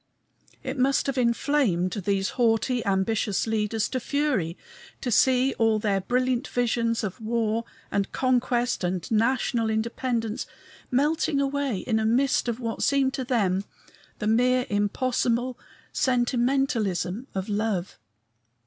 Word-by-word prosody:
It 260 Hz, +1 st, -4 dB
must 270 Hz, +2 st, +2 dB
have 275 Hz, -1 st, -2 dB
inflamed 235 Hz, -7 st, +1 dB
these 195 Hz, -1 st, -1 dB
haughty, 240 Hz, +1 st, +1 dB
ambitious 195 Hz, +1 st, +1 dB
leaders 220 Hz, -1 st, 0 dB
to 255 Hz, -, -2 dB
fury 255 Hz, -, -1 dB, 0.4 s
to 245 Hz, -, -3 dB
see 260 Hz, +3 st, +4 dB
all 225 Hz, -1 st, +3 dB
their 205 Hz, -2 st, 0 dB
brilliant 250 Hz, +5 st, 0 dB
visions 230 Hz, -2 st, 0 dB
of 195 Hz, +1 st, -5 dB
war 225 Hz, 0 st, -1 dB, 0.3 s
and 200 Hz, -1 st, -1 dB
conquest 245 Hz, -3 st, +1 dB
and 180 Hz, -1 st, -1 dB
national 230 Hz, 0 st, +1 dB
independence 225 Hz, 0 st, -2 dB, 0.4 s
melting 290 Hz, +2 st, +1 dB
away 280 Hz, -4 st, 0 dB
in 220 Hz, -2 st, 0 dB
a 220 Hz, -, 0 dB
mist 255 Hz, +3 st, +2 dB
of 235 Hz, 0 st, -2 dB
what 230 Hz, -2 st, -4 dB
seemed 275 Hz, -1 st, +2 dB
to 265 Hz, -, -2 dB
them 200 Hz, -7 st, +1 dB, 0.5 s
the 210 Hz, -, -4 dB
mere 250 Hz, +3 st, +3 dB
impossible 240 Hz, +4 st, 0 dB, 0.4 s
sentimentalism 245 Hz, -, 0 dB
of 190 Hz, 0 st, -2 dB
love. 205 Hz, -3 st, -2 dB
235 Hz, 125 wpm, -26 LUFS, 210-255 Hz, 0.5 s, see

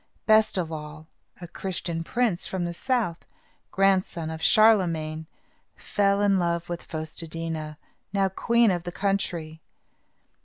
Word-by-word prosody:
Best 215 Hz, -1 st, +4 dB
of 170 Hz, -3 st, -2 dB
all, 155 Hz, 0 st, -7 dB, 0.3 s
a 175 Hz, -, -8 dB
Christian 170 Hz, -2 st, -4 dB
prince 220 Hz, -2 st, 0 dB
from 185 Hz, -2 st, -2 dB
the 170 Hz, -, -3 dB
south, 230 Hz, -5 st, -1 dB, 0.5 s
grandson 190 Hz, -4 st, +1 dB
of 160 Hz, 0 st, -7 dB
Charlemagne, 165 Hz, -9 st, +3 dB, 0.5 s
fell 200 Hz, -1 st, +1 dB
in 200 Hz, -2 st, +3 dB
love 170 Hz, 0 st, -1 dB
with 175 Hz, -1 st, -4 dB
Fos 155 Hz, -1 st, -6 dB
te 165 Hz, -, -3 dB
dí 165 Hz, +1 st, -4 dB
na, 155 Hz, -1 st, -5 dB, 0.4 s
now 195 Hz, -1 st, +2 dB
queen 230 Hz, +3 st, +2 dB
of 175 Hz, -2 st, -1 dB
the 175 Hz, -, -6 dB
country. 175 Hz, -5 st, -2 dB
175 Hz, 145 wpm, -26 LUFS, 160-200 Hz, 0.5 s, Best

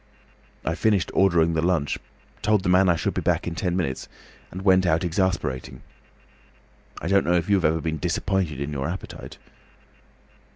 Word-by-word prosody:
I 80 Hz, -, 0 dB
finished 100 Hz, +1 st, +1 dB
ordering 85 Hz, -4 st, +3 dB
the 80 Hz, -, +1 dB
lunch, 85 Hz, -4 st, 0 dB, 0.4 s
told 105 Hz, -2 st, +2 dB
the 90 Hz, -, 0 dB
man 90 Hz, +1 st, +5 dB
I 85 Hz, -, +4 dB
should -, -, -2 dB
be -, -, -2 dB
back -, -, 0 dB
in 85 Hz, -, -3 dB
ten 90 Hz, +1 st, -1 dB
minutes, 70 Hz, -8 st, -2 dB, 0.4 s
and 95 Hz, +2 st, -7 dB
went 95 Hz, -1 st, +5 dB
out 80 Hz, 0 st, +2 dB
exasperated. 85 Hz, -8 st, -1 dB, 1.2 s
I 80 Hz, -, -5 dB
don't 100 Hz, +1 st, +3 dB
know 85 Hz, -, +1 dB
if 85 Hz, -1 st, 0 dB
you -, -, +6 dB
have 90 Hz, -, 0 dB
ever 80 Hz, +1 st, +2 dB
been 80 Hz, -1 st, -3 dB
disappointed 90 Hz, -2 st, -1 dB
in 70 Hz, +1 st, -4 dB
your 70 Hz, 0 st, -2 dB
appetite." 95 Hz, +3 st, -8 dB
85 Hz, 175 wpm, -24 LUFS, 80-95 Hz, 1.2 s, you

